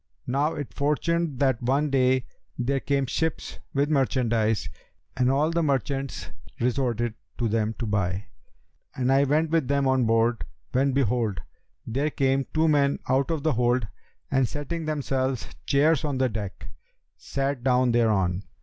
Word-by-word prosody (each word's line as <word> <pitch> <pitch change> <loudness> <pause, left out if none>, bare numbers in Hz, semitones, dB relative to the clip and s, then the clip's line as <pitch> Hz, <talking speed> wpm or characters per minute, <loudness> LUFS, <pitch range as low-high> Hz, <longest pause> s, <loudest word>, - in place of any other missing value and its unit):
Now 140 +5 0
it 145 -3 -6
fortuned 150 +1 0
that 130 -4 +2
one 140 +4 +1
day, 130 -1 +3 0.3
there 135 +2 0
came 140 0 0
ships 160 +5 -3
with 145 +2 0
merchandise, 120 -6 +1 0.5
and 125 -1 +2
all 145 +4 +2
the 170 0 +1
merchants 140 -2 -2 0.3
resorted 120 -2 0 0.2
to 120 - 0
them 110 0 0
to 120 - -3
buy, 100 -2 -1 0.7
and 130 0 +1
I 135 +1 +4
went 155 +3 +1
with 165 -6 +2
them 140 0 +1
on 130 -2 +3
board, 115 +1 +2 0.3
when 135 +2 +2
behold, 120 -6 0 0.4
there 140 +6 0
came 135 -1 +1
two 160 +1 +2
men 140 -2 +3
out 135 +3 +2
of 160 -3 -2
the 155 -2 +2
hold 120 -1 +1 0.4
and 135 -2 +3
setting 155 +3 -4
themselves 135 -4 -1 0.2
chairs 150 +2 +3
on 145 -3 -1
the 130 -1 +2
deck, 105 -3 -6 0.5
sat 135 -2 -3
down 125 -1 +3
thereon. 100 -6 +2
135 Hz, 150 wpm, -26 LUFS, 120-140 Hz, 0.7 s, I